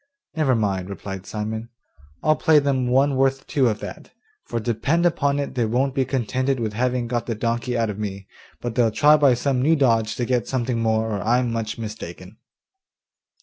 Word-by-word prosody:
'Never 145 -5 +2
mind,' 95 -4 -1
replied 95 -1 -7
Simon, 110 +2 -4 0.5
'I'll 155 0 +4
play 160 -1 +4
them 135 -3 +1
one 135 +3 +3
worth 135 0 +1
two 130 -4 +2
of 105 -1 -3
that; - - -8 0.3
for 115 - -3
depend 125 +10 0
upon 140 -4 +1
it 140 -2 -3
they 125 -3 0
won't 130 +4 0
be 135 -1 +1
contented 130 +1 -1
with 110 -2 -2
having 125 +2 0
got 120 -1 -2
the 115 - -2
donkey 120 +2 -1
out 115 -2 0
of 105 - -8
me, 100 -2 -5 0.4
but 120 -1 -3
they'll 115 -1 +3
try 145 +8 +5
by 140 -4 +4
some 130 0 0
new 155 +5 +4
dodge 115 -6 +2
to 120 - -2
get 125 -1 0
something 125 -2 -1
more, 110 0 +1
or 105 -3 -2
I'm 120 +3 +1
much 115 -1 -3
mistaken. 105 -3 -8
120 Hz, 190 wpm, -23 LUFS, 110-135 Hz, 0.5 s, try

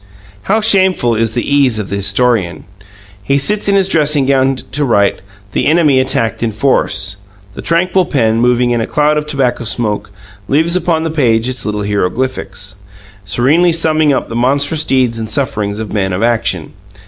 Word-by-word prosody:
How 220 +2 +3
shameful 190 - +2
is 115 0 -1
the 120 - -2
ease 140 -5 +2
of 105 -3 -4
the 100 - -3
historian! 100 -1 0 0.6
He 140 +7 0
sits 205 +8 0
in 200 - +3
his 195 -1 +3
dressing 150 -5 +2
gown 135 0 +2
to 145 +3 -4
write: 100 -6 +1 0.3
"The - - 0
enemy 150 -4 +3
attacked 125 -4 -1
in 115 -1 -1
force 105 -5 0 0.2
" 95 -1 -27
The - - -8
tranquil 175 +2 +1
pen, 115 -8 +1
moving 125 0 +2
in 120 -1 0
a 115 - -3
cloud 150 0 +1
of 150 - -8
tobacco 135 -5 -1
smoke, 105 -2 -2 0.4
leaves 160 +5 +2
upon 165 -3 0
the 165 - -2
page 120 -7 +1
its 125 -5 -3
little 105 0 -2
hieroglyphics, 100 -1 -3 0.5
serenely 150 - +2
summing 155 -2 +2
up 135 - -1
the 115 - -7
monstrous 140 +6 +1
deeds 125 -3 0
and 110 -1 -4
sufferings 105 -7 -2
of 110 -1 -6
men 95 -3 -1
of 95 +5 -2
action. 120 -1 -1
125 Hz, 180 wpm, -13 LUFS, 110-150 Hz, 0.6 s, How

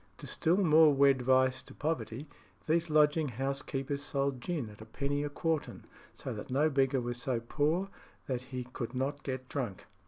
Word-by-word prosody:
To - - -9
still 170 +3 +1
more 160 -5 +6
wed 140 -1 +4
vice 130 0 +3
to - - -14
poverty, 150 -3 -3 0.4
these 165 +1 +1
lodging 150 0 +4
house 135 +3 -2
keepers 140 0 -3
sold 140 -2 -1
gin 155 -5 -2
at 105 - -14
a - - -9
penny 140 +5 -2
a 145 - -2
quartern, 160 +1 -2 0.3
so - - -5
that - - -7
no 145 +5 +2
beggar 135 -1 +2
was 120 0 -4
so 130 -4 0
poor 155 +10 0 0.4
that 125 -2 -2
he 130 -1 -4
could 120 +1 -4
not 140 +2 -1
get 130 -1 -4
drunk. 120 -10 -4
140 Hz, 185 wpm, -32 LUFS, 130-150 Hz, 0.4 s, more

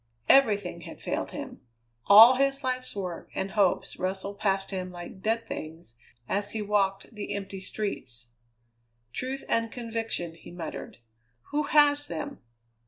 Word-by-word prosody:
Everything 205 -10 +4
had - - -10
failed - - -2
him. - - -7 0.5
All 220 +5 +11
his 275 +1 +1
life's 255 -2 -2
work 180 -4 -5
and 190 0 -2
hopes 200 -3 +1
rustled 190 +2 -3
past 195 -1 0
him 185 -1 -3
like 175 +2 -9
dead 225 +2 0
things 160 - -7 0.3
as 205 +1 -1
he 220 - -2
walked 200 0 0
the 210 -2 -4
empty 195 -1 -5
streets. 125 - -5 0.8
"Truth 265 +2 -4
and 230 -1 +1
conviction," 225 -8 -3
he 165 - -13
muttered. 170 -2 -7 0.5
"Who 295 +1 +1
has 290 0 +4
them? 285 -1 -5
205 Hz, 140 wpm, -28 LUFS, 185-240 Hz, 0.8 s, All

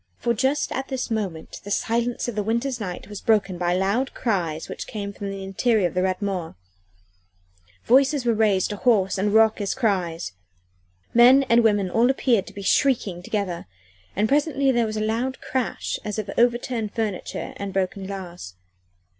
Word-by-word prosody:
For 235 - 0
just 265 +6 0
at 265 +1 -3
this 260 -3 -4
moment 195 -8 -4
the 205 - -8
silence 235 +4 0
of 240 - -2
the 210 - -1
winter's 235 +4 -1
night 185 -5 -5
was 205 -1 -8
broken 200 -5 +1
by 175 0 +1
loud 200 +8 0
cries 170 -9 -1
which - - -6
came 200 -2 -5
from 200 0 -5
the 195 0 -6
interior 195 +1 +1
of - - -8
the 180 - +1
Rat 185 +1 -1
Mort 185 -5 -3 1.3
voices 270 +2 +3
were 235 - +3
raised 210 -3 +2
to 205 - -4
hoarse 200 -5 +2
and 205 +2 +1
raucous 220 -2 +3
cries 180 - -1 0.8
men 250 +3 +7
and 235 0 +5
women 205 -4 +2
all 235 +5 +3
appeared 245 -6 +2
to - - -11
be 200 - -7
shrieking 210 -7 +1
together, 185 - -3 0.5
and 210 +3 +2
presently 280 0 +2
there 235 -2 +2
was 215 0 -4
a - - -1
loud 230 +5 -1
crash 260 -2 -2
as 210 -1 -4
of 210 -2 -3
overturned 240 -2 +1
furniture 215 -5 -3
and 200 -1 -4
broken 190 0 -2
glass. 180 - -7
215 Hz, 175 wpm, -24 LUFS, 190-240 Hz, 1.3 s, men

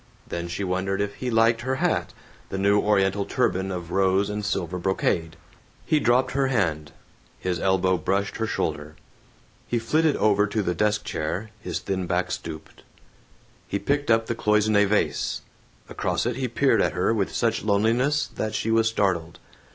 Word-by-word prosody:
Then 85 0 -4
she 85 +4 -4
wondered 95 +1 -1
if 100 0 -1
he 125 - -3
liked 115 0 +3
her 130 +2 -1
hat, - - 0 0.4
the 95 - -4
new 100 +1 +3
Oriental 100 -1 +2
turban 95 -1 0
of 90 -2 -5
rose 95 +1 +2
and 105 0 -3
silver 90 -3 -2
brocade. 85 -3 0 0.5
He 155 - +2
dropped 125 -1 +2
her 135 0 +1
hand. 80 - 0 0.5
His 90 -2 -2
elbow 95 0 +2
brushed 95 +4 -1
her 115 - -1
shoulder. 75 -6 -3 0.7
He 120 - 0
flitted 150 +7 +2
over 105 -1 +3
to 105 0 -1
the 90 - 0
desk 105 +4 +1
chair, 95 +8 -3
his 90 -5 -4
thin 95 -2 -3
back 90 0 0
stooped. 80 -2 -7 0.9
He 100 - -1
picked 145 +6 -1
up 115 0 +4
the 115 - -2
cloisonne 105 -2 +3
vase. 105 +1 0 0.4
Across - - -2
it 120 0 -1
he 130 -1 -1
peered 135 +3 +2
at - - +1
her 90 +5 +1
with 100 -4 -1
such 115 -2 0
loneliness 115 +8 +2
that 110 -5 -4
she 115 - -1
was 115 0 +3
startled. 90 -7 -1
100 Hz, 170 wpm, -25 LUFS, 95-115 Hz, 0.9 s, up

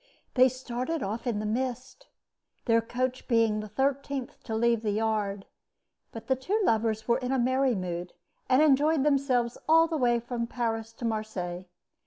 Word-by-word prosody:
They 255 0 +6
started 255 +5 -4
off 220 +5 -4
in 230 -3 0
the 210 - -3
mist, 255 - -3 0.6
their 230 -1 +4
coach 255 +2 -3
being 225 -3 +2
the 215 - -5
thirteenth 270 +3 -2
to 220 - -3
leave 235 0 +2
the 220 - -1
yard; 210 -2 -1 0.7
but 225 - -9
the 265 - +2
two 370 - -1
lovers 220 - +1
were 235 +1 +3
in 250 0 -3
a 270 - +2
merry 260 0 +2
mood, 180 -2 -4 0.4
and 260 +3 +5
enjoyed 300 0 +4
themselves 265 -5 +1
all 325 +1 +7
the 325 -1 -2
way 240 -3 +2
from 235 0 -4
Paris 225 -2 -3
to 235 - -7
Marseilles. 190 -5 -3
240 Hz, 170 wpm, -28 LUFS, 220-260 Hz, 0.7 s, all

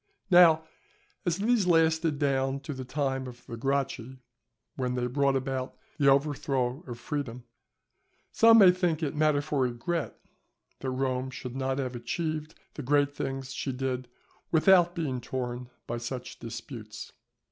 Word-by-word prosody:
Now, 170 -3 +7 0.6
as 170 0 +1
these 215 -1 +2
lasted 160 -2 +3
down 135 -1 0
to 145 - -5
the 130 -1 -6
time 135 0 -2
of 120 -1 -11
the 115 - -7
Gracchi, 130 0 -2 0.6
when 125 -2 -2
they 125 -1 -1
brought 140 +2 +1
about 130 -1 -3 0.2
the 140 - +3
overthrow 135 -1 +1
of 120 -2 -6
freedom, 125 -2 -4 0.9
some 230 0 +7
may 195 -5 +9
think 175 -3 0
it 150 -1 -2
matter 150 -1 +2
for 145 -2 -1
regret 130 +7 -2 0.6
that 130 - -3
Rome 130 0 -1
should 125 -1 -7
not 135 0 -1
have 130 -2 -3
achieved 155 +5 -3 0.2
the - - -6
great 145 +1 +2
things 135 -1 -4
she 135 - -3
did, 130 -1 -3 0.4
without 175 +1 +5
being 140 -7 -2
torn 125 0 -4 0.2
by 120 0 -3
such 125 +1 -6
disputes. 115 -1 -8
135 Hz, 145 wpm, -28 LUFS, 125-155 Hz, 0.9 s, may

